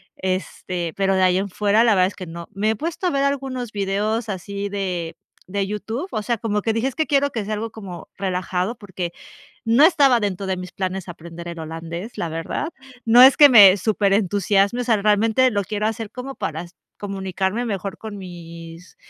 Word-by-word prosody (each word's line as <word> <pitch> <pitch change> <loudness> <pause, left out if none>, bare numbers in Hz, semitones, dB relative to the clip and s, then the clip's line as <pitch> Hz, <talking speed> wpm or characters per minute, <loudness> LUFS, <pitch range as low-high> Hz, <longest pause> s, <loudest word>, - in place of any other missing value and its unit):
este, 185 -2 -3
pero 195 -1 +1
de 190 - +2
ahí 185 0 +4
en 200 +1 -2
fuera 210 +3 +2
la 230 -2 +4
verdad 185 -1 +4
es 195 - -8
que 185 - -7
no. 170 0 -8
Me 210 +3 +1
he - - -1
puesto 330 - -3
a - - +1
ver 275 0 +1
algunos 265 -4 -2
videos 210 +3 -1
así 200 +1 -4
de 180 -4 -3 0.3
de 200 +1 -1
YouTube, 220 - -4
o 215 - -2
sea, 235 +1 -1
como 210 -1 -1
que 225 - 0
dije: 230 +4 0
"Es 265 - -13
que 315 - 0
quiero 285 -1 +2
que 220 -5 -3
sea 215 - -3
algo 220 +2 -4
como 190 -6 -9
relajado", 185 +2 -2
porque, 185 -5 -6 0.5
no 230 +4 +4
estaba 280 -8 +5
dentro 200 -2 -2
de 190 -1 -1
mis 180 0 -7
planes 190 0 -4
aprender 170 0 -9
el 170 -1 -7
holandés, 165 +6 -7
la 170 - -2
verdad, 165 - -3 0.4
no 235 +2 +7
es 265 +1 +8
que 295 -2 +9
me 205 -7 +9
súper 200 0 +1
entusiasme, 200 +3 +2
o - - -5
sea, 230 -3 +2
realmente 220 +5 +3
lo 205 -3 -1
quiero 210 +2 -1
hacer 220 -1 -5 0.3
para 160 +1 -3
s 175 0 -14 0.2
comunicarme 195 +2 -2
mejor 195 -4 -4
con 220 -2 -7
mis 170 -1 -11
200 Hz, 205 wpm, -22 LUFS, 185-225 Hz, 0.5 s, que